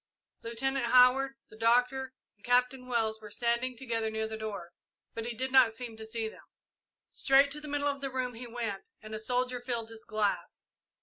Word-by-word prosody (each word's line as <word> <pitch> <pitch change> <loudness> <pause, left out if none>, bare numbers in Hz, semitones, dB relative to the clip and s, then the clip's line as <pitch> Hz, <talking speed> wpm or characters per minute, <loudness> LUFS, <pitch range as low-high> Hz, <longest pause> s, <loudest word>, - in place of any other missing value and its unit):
Lieutenant 240 +2 -1
Howard, 255 +2 +5
the - - -14
Doctor, 250 +3 +2 0.2
and 205 - -34
Captain 250 +1 +2
Wells 220 -3 0
were 210 - -9
standing 235 +3 0
together 230 -3 -1
near 220 0 -2
the 220 - -5
door, 210 -5 -6 0.4
but 225 0 -4
he 240 - -4
did 260 +1 -2
not 255 -4 +6
seem 230 0 -7
to 220 0 -8
see 225 0 -2
them. - - -11 0.7
Straight 275 +1 +4
to 300 +1 -2
the 300 - -8
middle 290 0 0
of 280 -1 -1
the 275 - -2
room 255 -1 -2
he 240 +2 -8
went, 225 -5 -4
and 215 0 -8
a 215 - -3
soldier 250 +2 -1
filled 235 -2 -3
his 225 -1 -9
glass. 215 -2 -2
240 Hz, 195 wpm, -31 LUFS, 220-260 Hz, 0.7 s, not